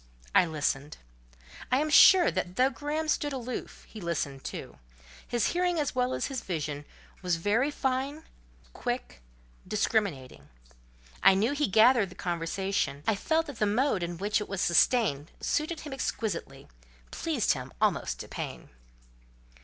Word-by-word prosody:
I -, -, +5 dB
listened. 150 Hz, -2 st, -2 dB, 0.7 s
I 255 Hz, -, +4 dB
am 305 Hz, +2 st, 0 dB
sure 360 Hz, +3 st, +8 dB
that 180 Hz, -1 st, -3 dB
though 260 Hz, +4 st, +3 dB
Graham 295 Hz, +4 st, -3 dB
stood 295 Hz, -1 st, 0 dB
aloof, 255 Hz, -1 st, -6 dB
he 215 Hz, -, -10 dB
listened 145 Hz, -6 st, -3 dB
too: -, -, -7 dB, 0.5 s
his 240 Hz, -3 st, +1 dB
hearing 355 Hz, -1 st, 0 dB
as 290 Hz, -, -1 dB
well 250 Hz, 0 st, 0 dB
as -, -, -1 dB
his 265 Hz, -3 st, -4 dB
vision 150 Hz, -4 st, -4 dB, 0.4 s
was 180 Hz, -2 st, +1 dB
very 210 Hz, -, +1 dB
fine, 275 Hz, +2 st, -2 dB, 0.5 s
quick, -, -, -4 dB, 0.5 s
discriminating. 190 Hz, -, -1 dB, 0.7 s
I 195 Hz, 0 st, +7 dB
knew 215 Hz, +7 st, +2 dB
he 295 Hz, +1 st, 0 dB
gathered 220 Hz, 0 st, +5 dB
the 180 Hz, -, -13 dB
conversation; 170 Hz, -3 st, -2 dB
I 220 Hz, -, +3 dB
felt 320 Hz, +10 st, 0 dB
that 285 Hz, -6 st, -9 dB
the 210 Hz, -, +2 dB
mode 215 Hz, -1 st, +1 dB
in 170 Hz, 0 st, -4 dB
which 205 Hz, +3 st, 0 dB
it 210 Hz, -, -6 dB
was 195 Hz, -1 st, -3 dB
sustained 170 Hz, -, +3 dB
suited 310 Hz, +1 st, -1 dB
him 295 Hz, -3 st, -7 dB
exquisitely—pleased 135 Hz, -, -3 dB
him 130 Hz, -1 st, -7 dB
almost -, -, 0 dB
to -, -, -8 dB
pain. -, -, -7 dB
210 Hz, 145 wpm, -29 LUFS, 165-270 Hz, 0.7 s, sure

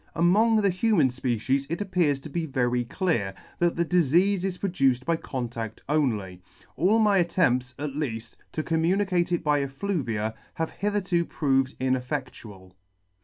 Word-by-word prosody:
Among 215 Hz, +6 st, +4 dB
the 200 Hz, -, +3 dB
human 180 Hz, -6 st, +3 dB
fpecies 130 Hz, +2 st, -1 dB
it 170 Hz, -, -2 dB
appears 180 Hz, -8 st, +1 dB
to 155 Hz, -, -9 dB
be 165 Hz, +1 st, -2 dB
very 125 Hz, -3 st, 0 dB
clear, 115 Hz, -, -1 dB, 0.2 s
that 175 Hz, -1 st, +2 dB
the 170 Hz, -, +1 dB
difeafe 180 Hz, +3 st, +3 dB
is 190 Hz, -2 st, -2 dB
produced 135 Hz, -10 st, +1 dB
by 170 Hz, -, +2 dB
contadt 120 Hz, -7 st, -5 dB
only. 110 Hz, -12 st, -1 dB, 0.3 s
All 185 Hz, -, +3 dB
my 210 Hz, -3 st, +4 dB
attempts, 130 Hz, -8 st, +1 dB
at 145 Hz, 0 st, -3 dB
leaft, 115 Hz, -6 st, -4 dB, 0.2 s
to 155 Hz, -, -2 dB
com 160 Hz, 0 st, 0 dB
municate 180 Hz, 0 st, +1 dB
it 175 Hz, -1 st, 0 dB
by 150 Hz, -2 st, +2 dB
effluvia 135 Hz, -, -2 dB, 0.2 s
have 160 Hz, 0 st, -2 dB
hitherto 195 Hz, -4 st, 0 dB
proved 135 Hz, -5 st, 0 dB
ineffectual. 125 Hz, -7 st, -4 dB
150 Hz, 150 wpm, -26 LUFS, 125-180 Hz, 0.3 s, Among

